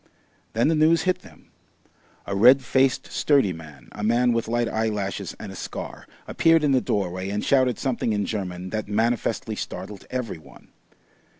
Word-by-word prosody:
Then 115 +4 +2
the 165 - +3
news 160 +2 +4
hit 185 -1 +1
them. - - -18 0.7
A 100 - -3
red 125 +6 +6
faced 130 +1 +2
sturdy 135 -11 +2
man, 80 -6 -12
a 105 - -8
man 120 +2 +3
with 115 -1 -1
light 120 +1 0
eyelashes 105 -3 -2
and - - -7
a - - -9
scar, - - -7 0.2
appeared 165 -1 +3
in 145 - +3
the 130 -2 +3
doorway 95 -3 -2
and 105 +1 -2
shouted 130 -4 +3
something 125 -3 -1
in 105 -1 0
German 90 -3 -4
that 110 -2 -3
manifestly 110 +3 0
startled 105 -2 -7
every 125 -9 -4
one. - - -17
115 Hz, 170 wpm, -24 LUFS, 100-130 Hz, 0.7 s, red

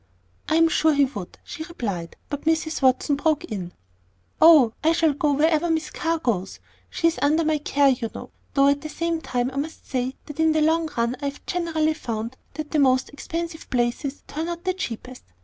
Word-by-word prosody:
"I 315 - +2
am 330 0 +6
sure 315 -1 +3
he 280 0 +5
would," 205 -9 -8
she 315 - -7
replied; 200 - -5
but 285 0 -5
Mrs. 320 -1 0
Watson 265 +2 +3
broke 310 0 +1
in, 185 -5 -5 0.7
"Oh, 305 -9 +8
I 320 +1 +4
shall 325 -3 +3
go 290 +1 +1
wherever 315 +3 +2
Miss 315 -2 -1
Carr 330 0 -1
goes. 200 - -2 0.3
She's 330 -5 +1
under 310 +3 +3
my 310 -1 +1
care, 285 -1 +3
you 250 -3 0
know - - -8 0.2
Though 275 0 +5
at 285 0 +1
the 310 - -6
same 335 +1 -2
time 250 -2 -1
I 270 - -8
must 305 +3 -4
say 255 0 -2
that 295 +1 -10
in 320 0 +4
the 310 - +2
long 320 +1 +2
run 235 +2 0
I - - -3
have 280 0 -5
generally 320 -3 0
found 230 -4 -4 0.2
that 310 -1 -5
the 310 - +2
most 260 -2 +3
expensive 330 +2 -6
places 245 +3 -1
turn 315 +2 -4
out 345 0 -5
the 370 0 0
cheapest. 255 -7 -6
295 Hz, 200 wpm, -24 LUFS, 255-320 Hz, 0.7 s, Oh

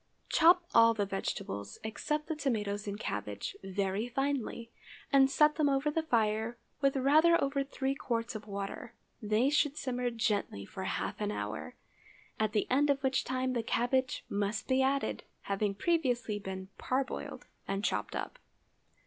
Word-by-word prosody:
Chop 345 +2 +6
all 230 0 +7
the 205 -2 0
vegetables, 100 - -4
except 300 +7 -2
the 320 - -3
tomatoes 210 -8 -1
and 200 +1 -4
cabbage, 105 - -4
very 195 +3 -1
finely, 255 -3 -2 0.4
and 270 -1 +6
set 300 +2 +4
them 300 -2 +3
over 275 +2 +1
the 325 - +1
fire 225 -4 +1 0.2
with 275 -1 +3
rather 310 +6 +5
over 275 0 0
three 270 0 -2
quarts 235 -3 -2
of 215 -1 -7
water. 200 +3 -5 0.3
They 220 +5 +2
should 295 -1 +2
simmer 250 -1 -1
gently 210 - -1
for - - -6
half - - -3
an - - 0
hour, 105 -6 -4 0.6
at 215 -1 +1
the 210 - +2
end 285 +3 +4
of 280 -1 +2
which 265 0 +2
time 255 0 -1
the 240 - 0
cabbage 255 +3 0
must 205 +1 -2
be 260 0 +3
added, 275 +1 +1 0.2
having 200 0 -1
previously 245 - 0
been 190 -1 -6
parboiled 260 0 -2 0.2
and 195 +1 -1
chopped - - -1
up. - - -5
240 Hz, 155 wpm, -32 LUFS, 205-275 Hz, 0.6 s, all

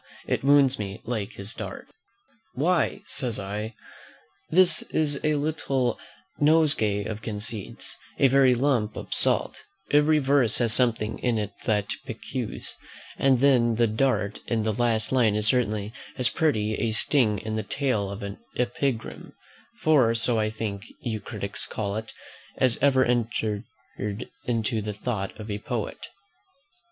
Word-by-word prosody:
it - - -1
wounds 140 -2 +5
me 100 +1 -4
like 110 -3 -3
his 100 +3 -5
dart." - - -7 0.7
"Why," 180 +7 +1
says 130 - 0
I, 105 +3 -4 0.7
"this 180 +2 +5
is 145 -3 -1
a 155 -1 +2
little 140 -5 0 0.4
nosegay 145 -10 +3
of 110 0 -5
conceits, 105 -1 -6 0.2
a 135 - +5
very 130 -1 +5
lump 120 -5 +1
of - - -5
salt: - - +1 0.3
every 150 +1 +5
verse 135 -5 +3
has 115 -2 +3
something 115 -3 +2
in 120 -2 +1
it 105 -2 -2
that 105 -2 +2 0.2
piques; 125 0 -3 0.4
and 130 -2 +4
then 120 -4 +4
the 120 +1 +3
dart 110 -2 0
in 115 -2 0
the 110 0 0
last 115 -1 0
line 120 -5 +3
is 105 0 0
certainly 110 -3 +1 0.2
as 125 -3 +2
pretty 110 -10 +1
a 115 -2 0
sting 110 -2 +3
in 110 +1 -4
the 110 - 0
tail 110 -2 -1
of 100 +1 -6
an 100 0 -6 0.2
epigram, 125 -1 -2 0.5
for 130 -8 +4
so 115 0 +1
I 110 0 +1
think 110 -2 -4 0.2
you 110 -3 -2
critics 100 -3 -4
call 100 -2 -3
it, 110 +1 -5 0.5
as 130 -3 +2
ever 130 -2 +4
entered 115 -3 0 0.8
into 115 -1 0
the 105 0 -4
thought 105 -2 -3
of 105 0 -6
a 100 - -3
poet." 115 -1 -4
115 Hz, 145 wpm, -26 LUFS, 105-135 Hz, 0.8 s, wounds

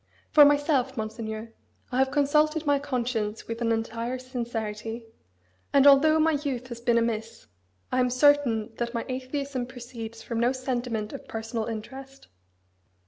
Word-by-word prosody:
For 300 - +9
myself, 285 -3 +2
Monseigneur, 220 0 -5 0.4
I 250 - 0
have 265 0 +3
consulted 300 +2 +2
my 285 -1 +3
conscience 240 -6 -2
with 230 +1 -5
an 230 -1 +1
entire 230 +2 -2
sincerity; 230 -3 -5 0.7
and 280 -1 +6
although 290 +3 +7
my 320 +1 +4
youth 255 -4 -3
has 235 -1 -7
been 235 -1 +3
amiss, 230 -1 -2 0.5
I 255 - +1
am 250 0 +3
certain 255 -4 +3
that 235 0 -3
my 230 - -2
atheism 260 0 -3
proceeds 235 -3 -8
from 230 -1 -3
no 240 +2 +3
sentiment 245 -4 -3
of 275 - -9
personal 225 0 -4
interest. 265 +5 -8
245 Hz, 145 wpm, -27 LUFS, 230-275 Hz, 0.7 s, For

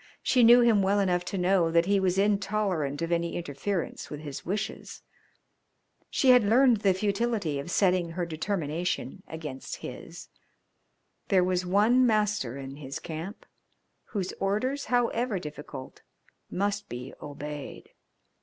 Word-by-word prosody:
She 255 - +3
knew 240 +2 +8
him 230 -4 +4
well 195 +1 +2
enough 180 -3 +1
to 195 - -3
know 180 -2 +3
that 170 +1 +3
he 200 +1 +3
was 185 -1 +1
intolerant 195 -7 0
of 165 - -3
any 170 0 0
interference 170 +3 -3
with 150 0 -7
his 145 -3 -7
wishes. 200 +4 -4 1.1
She 260 - +4
had 250 -2 +6
learned 240 +3 +5
the 195 -2 +2
futility 200 -6 -1
of 140 - -6
setting 180 -2 +2
her 175 0 -2
determination 170 +2 -3
against 155 -5 -6
his. - - -9 1.0
There 185 -2 +4
was 180 0 0
one 215 +7 +4
master 210 - 0
in 135 0 -8
his 140 -2 -6
camp, 170 +6 -7 0.6
whose 190 -4 -3
orders, 235 +9 -1
however 240 -2 +1
difficult, 150 -5 -8 0.5
must 205 +1 -2
be 125 +2 -7
obeyed. 145 0 -7
185 Hz, 135 wpm, -28 LUFS, 160-210 Hz, 1.1 s, knew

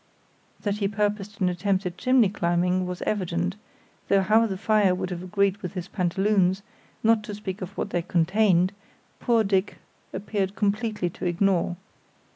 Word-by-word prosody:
That 205 -1 -1
he 200 - +1
purposed 205 0 -2
an 185 - +3
attempt 190 +2 0
at 175 -1 -3
chimney 255 -1 +3
climbing 180 -1 0
was 180 -1 -5
evident, 180 -2 -1 0.5
though 195 -1 +3
how 220 +4 +4
the 190 -3 -4
fire 210 -2 +3
would 185 - -4
have 175 -1 -4
agreed 195 +1 +1
with 180 -4 -7
his 180 0 -4
pantaloons, 190 +1 +1 0.4
not 225 -1 +4
to 210 - -6
speak 200 -2 -6
of 185 +2 -7
what 205 - -3
they 175 - 0
contained, 185 +1 +2 0.5
poor 230 -2 +2
Dick 195 0 0 0.3
appeared 195 0 -2
completely 210 -3 -1
to - - -7
ignore. 175 0 +1
195 Hz, 160 wpm, -25 LUFS, 180-210 Hz, 0.5 s, how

